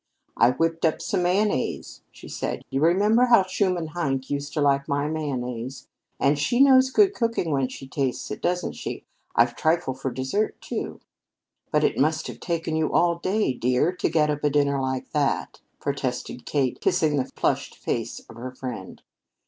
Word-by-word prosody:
"I -, -, +5 dB
whipped 165 Hz, +5 st, 0 dB
up 160 Hz, -2 st, +2 dB
some 190 Hz, -, -1 dB
mayonnaise," 185 Hz, -3 st, 0 dB
she -, -, -13 dB
said. -, -, -4 dB
"You 135 Hz, +1 st, 0 dB
remember 205 Hz, +9 st, +4 dB
how 235 Hz, -5 st, +6 dB
Schumann 185 Hz, -3 st, -1 dB
Heink 135 Hz, -5 st, -2 dB
used 140 Hz, 0 st, -2 dB
to -, -, 0 dB
like 140 Hz, -1 st, +2 dB
my 145 Hz, 0 st, 0 dB
mayonnaise? 130 Hz, -5 st, -4 dB, 0.3 s
And 140 Hz, +1 st, +2 dB
she 195 Hz, -, +1 dB
knows 265 Hz, -1 st, +7 dB
good 395 Hz, +8 st, +4 dB
cooking 230 Hz, -, -1 dB
when 135 Hz, -2 st, +1 dB
she 135 Hz, -, -9 dB
tastes 135 Hz, -2 st, -2 dB
it, -, -, -5 dB
doesn't 180 Hz, 0 st, 0 dB
she? -, -, -6 dB, 0.3 s
I've 120 Hz, 0 st, +3 dB
trifle 160 Hz, -2 st, +1 dB
for 130 Hz, +1 st, -4 dB
desert, 130 Hz, -, -2 dB
too." -, -, -5 dB, 0.7 s
"But -, -, +2 dB
it -, -, +1 dB
must -, -, +2 dB
have -, -, -7 dB
taken 165 Hz, -2 st, -2 dB
you 160 Hz, -1 st, 0 dB
all 170 Hz, -1 st, +3 dB
day, 190 Hz, -5 st, +1 dB
dear, 125 Hz, +6 st, +1 dB
to -, -, +1 dB
get 150 Hz, -2 st, +2 dB
up 150 Hz, 0 st, -4 dB
a 150 Hz, -, +4 dB
dinner 140 Hz, -1 st, +2 dB
like 130 Hz, -1 st, -3 dB
that," 145 Hz, -3 st, -1 dB, 0.2 s
protested 130 Hz, -3 st, -3 dB
Kate, 135 Hz, -4 st, 0 dB
kissing 150 Hz, -2 st, +2 dB
the 130 Hz, -1 st, -1 dB
flushed -, -, 0 dB
face -, -, -3 dB
of 115 Hz, -, -15 dB
her 125 Hz, +2 st, -5 dB
friend. 125 Hz, -8 st, -7 dB
150 Hz, 180 wpm, -25 LUFS, 130-175 Hz, 0.7 s, knows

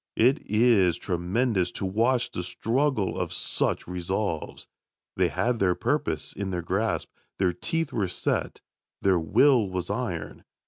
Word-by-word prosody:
It 130 Hz, +6 st, +4 dB
is 105 Hz, -6 st, +4 dB
tremendous 95 Hz, +3 st, 0 dB
to -, -, -3 dB
watch 115 Hz, +6 st, +1 dB
the -, -, -3 dB
struggle 115 Hz, +4 st, 0 dB
of -, -, -2 dB
such -, -, -1 dB
resolves. 90 Hz, -1 st, -3 dB, 0.5 s
They -, -, +3 dB
had 120 Hz, -1 st, 0 dB
their 90 Hz, -2 st, +3 dB
purpose -, -, -1 dB
in 100 Hz, -1 st, -4 dB
their 90 Hz, -2 st, -3 dB
grasp, 100 Hz, +5 st, -1 dB, 0.3 s
their 90 Hz, -2 st, +2 dB
teeth 165 Hz, -, -2 dB
were 100 Hz, -4 st, 0 dB
set, 90 Hz, -, -2 dB, 0.4 s
their 95 Hz, -2 st, +4 dB
will 115 Hz, -, +4 dB
was 90 Hz, 0 st, -3 dB
iron. 100 Hz, -8 st, -4 dB
100 Hz, 140 wpm, -26 LUFS, 90-120 Hz, 0.5 s, It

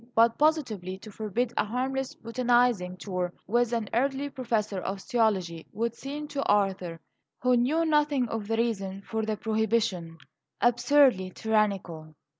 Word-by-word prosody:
But 230 Hz, 0 st, +4 dB
positively 230 Hz, -, +1 dB
to 215 Hz, +3 st, -12 dB
forbid 225 Hz, +4 st, -2 dB
a -, -, +3 dB
harmless 260 Hz, +4 st, -2 dB
botanizing 235 Hz, -5 st, +1 dB
tour 180 Hz, -1 st, -3 dB
with 240 Hz, +3 st, +1 dB
an 230 Hz, -3 st, -1 dB
elderly 275 Hz, +4 st, 0 dB
professor 220 Hz, -6 st, -1 dB
of 195 Hz, +2 st, -4 dB
theology 190 Hz, -7 st, 0 dB
would 230 Hz, +2 st, -1 dB
seem 290 Hz, +4 st, -6 dB
to 280 Hz, -, -2 dB
Arthur, 190 Hz, -5 st, +1 dB, 0.4 s
who 250 Hz, 0 st, +4 dB
knew 290 Hz, +8 st, +2 dB
nothing 295 Hz, -5 st, +2 dB
of 220 Hz, -2 st, -4 dB
the 225 Hz, +1 st, 0 dB
reason 200 Hz, -4 st, -2 dB
for 220 Hz, +1 st, -3 dB
the 215 Hz, -1 st, -2 dB
prohibition, 215 Hz, -7 st, 0 dB, 0.4 s
absurdly 240 Hz, -4 st, +4 dB
tyrannical. 190 Hz, -7 st, -1 dB
225 Hz, 140 wpm, -28 LUFS, 195-250 Hz, 0.4 s, But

